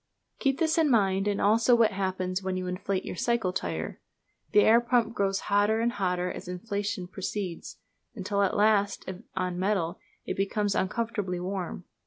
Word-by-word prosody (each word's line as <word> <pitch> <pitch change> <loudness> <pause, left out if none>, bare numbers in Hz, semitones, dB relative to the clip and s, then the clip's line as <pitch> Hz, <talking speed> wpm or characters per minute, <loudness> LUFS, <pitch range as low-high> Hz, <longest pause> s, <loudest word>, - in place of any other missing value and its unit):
Keep 270 -1 +1
this 325 0 +2
in 315 -2 +4
mind, 195 -4 +2
and 205 -1 0
also 230 +4 +4
what 230 -2 +4
happens 185 -1 -2
when 190 -1 -2
you 185 - -3
inflate 185 +1 -2
your - - -5
cycle 225 -2 0
tyre. 80 - -4 0.5
The 210 - +6
air 230 +3 +6
pump 235 -1 +1
grows 195 -3 0
hotter 205 +2 +2
and 235 +1 +1
hotter 180 -4 -1
as - - -8
inflation 200 +1 -3
proceeds: 190 -1 -5 0.4
until 200 -1 -1
at 200 - +1
last, 205 -1 +3
if 185 - -6 0.2
of 185 -1 0
metal, 185 -2 -1 0.3
it - - -3
becomes 200 +1 0
uncomfortably 205 -2 -1
warm. 180 -1 -4
200 Hz, 170 wpm, -28 LUFS, 185-220 Hz, 0.5 s, The